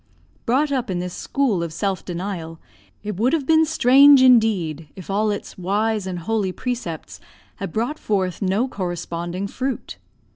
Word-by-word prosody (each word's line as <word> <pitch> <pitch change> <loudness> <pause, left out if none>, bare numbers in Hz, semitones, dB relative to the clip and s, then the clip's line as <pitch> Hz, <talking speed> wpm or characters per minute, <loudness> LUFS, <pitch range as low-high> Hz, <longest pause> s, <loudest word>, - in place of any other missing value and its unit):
Brought 280 +5 +2
up 255 -4 -1
in 185 - -1
this 180 0 -4
school 250 -11 0
of 170 -1 -3
self 190 +4 -2
denial, 175 -2 -5 0.4
it 210 -3 -4
would 240 +7 +2
have 310 -4 0
been 320 +2 +4
strange 280 -2 +6
indeed 200 - +3
if 190 0 -8
all 210 +2 +1
its 205 -2 -5
wise 205 +2 0
and 185 -1 -4
holy 195 +2 -1
precepts 205 -8 -5 0.4
had - - -5
brought 240 - -2
forth 190 -3 -1
no 200 +6 +1
corresponding 175 -2 -4
fruit. 260 +5 -4
205 Hz, 155 wpm, -22 LUFS, 180-250 Hz, 0.4 s, strange